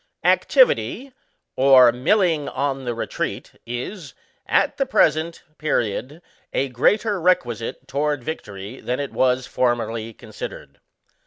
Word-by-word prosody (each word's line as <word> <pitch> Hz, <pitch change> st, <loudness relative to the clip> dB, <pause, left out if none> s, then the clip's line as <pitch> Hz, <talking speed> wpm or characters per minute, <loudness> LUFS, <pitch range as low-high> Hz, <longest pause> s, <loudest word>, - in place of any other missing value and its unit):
Activity, 280 Hz, -, +3 dB, 0.4 s
or 130 Hz, -2 st, +7 dB
milling 155 Hz, -, +1 dB
on 135 Hz, 0 st, -2 dB
the 120 Hz, -1 st, -2 dB
retreat, 115 Hz, -, -4 dB, 0.2 s
is, 130 Hz, -, -6 dB, 0.3 s
at -, -, +2 dB
the 275 Hz, -, +1 dB
present 165 Hz, -, +1 dB, 0.2 s
period, 140 Hz, -, -2 dB, 0.3 s
a 135 Hz, -, 0 dB
greater 205 Hz, -, +1 dB
requisite 120 Hz, -10 st, 0 dB
toward 145 Hz, -1 st, -1 dB
victory 105 Hz, -6 st, -7 dB
than 125 Hz, +2 st, -2 dB
it 140 Hz, -1 st, -4 dB
was 130 Hz, 0 st, +2 dB
formerly 115 Hz, -3 st, -1 dB
considered. -, -, -9 dB
135 Hz, 110 wpm, -22 LUFS, 120-165 Hz, 0.4 s, or